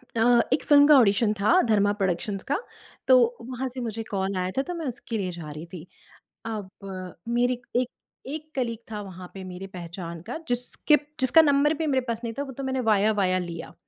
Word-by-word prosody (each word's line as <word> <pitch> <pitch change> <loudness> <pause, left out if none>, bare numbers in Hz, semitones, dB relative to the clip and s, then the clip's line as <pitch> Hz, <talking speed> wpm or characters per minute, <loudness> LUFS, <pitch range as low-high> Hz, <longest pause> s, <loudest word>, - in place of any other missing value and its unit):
अ, - - 0 0.3
एक - - +1
फ़िल्म 290 -1 +7
का 300 -2 +8
ऑडिशन 210 -2 +4
था, 345 - +5
धर्मा 205 - +3
प्रोडक्शंस 195 0 -2
का। 285 - +3 0.5
तो 245 -2 +5
वहाँ 255 +2 -4
से 255 +1 -7
मुझे 225 -1 -4
कॉल 195 -1 -1
आया 185 0 -1
था, - - +4
तो 355 +6 -5
मैं 330 -3 -5
उसके 235 -2 -4
लिए 185 -3 -2
जा 165 -3 -8
रही 155 +3 -7
थी। 170 -1 -8 0.6
अब 215 -4 -4 0.6
मेरी 245 +1 +1 0.2
एक 255 - -2 0.4
एक 310 +2 -6
कलीग 235 -4 -1
था 210 - -4
वहाँ 185 -2 -9
पे 195 - -8
मेरी 185 +1 -7
पहचान 170 -2 -7
का 250 - -4
जिसके 245 +4 +2 0.2
जिसका 260 +5 +6
नंबर 290 0 +3
भी 320 - -1
मेरे 265 -3 +2
पास 230 -1 -2
नहीं 230 - -3
था, 280 - -3
वो 275 - -8
तो 275 +2 -6
मैंने 265 0 -1
वाया 215 -1 +3
वाया 185 -2 +2
लिया, 170 -2 -6
225 Hz, 210 wpm, -26 LUFS, 190-260 Hz, 0.6 s, का